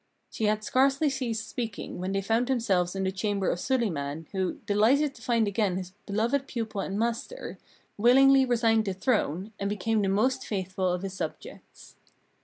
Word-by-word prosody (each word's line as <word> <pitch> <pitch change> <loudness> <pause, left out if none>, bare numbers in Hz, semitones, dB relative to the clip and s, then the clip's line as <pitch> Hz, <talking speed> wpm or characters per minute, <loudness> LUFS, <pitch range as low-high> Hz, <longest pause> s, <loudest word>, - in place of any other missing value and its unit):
She 220 - -2
had 215 0 +1
scarcely 275 +5 +2
ceased 235 -4 -3
speaking 230 -7 -5
when 185 +1 -3
they 195 0 -1
found 225 +4 +1
themselves 195 -9 +1
in 195 - -1
the 190 - 0
chamber 200 0 -1
of 175 - -3
Suliman, 165 - -1
who, 190 -2 -1
delighted 255 +8 +3
to 235 - -16
find 230 -2 +1
again 200 -2 0
his 185 -1 -6 0.2
beloved 235 +7 0
pupil 220 -4 -3
and 195 +1 -3
master, 235 - -3 0.4
willingly 270 +4 +6
resigned 225 -3 +2
the 195 -2 -2
throne, 190 - -1
and 200 - -1
became 210 +2 0
the 195 - +1
most 255 +7 +1
faithful 185 -2 -1
of 180 +1 -2
his 195 -1 -4
subjects. 190 - -8
215 Hz, 175 wpm, -28 LUFS, 190-245 Hz, 0.4 s, willingly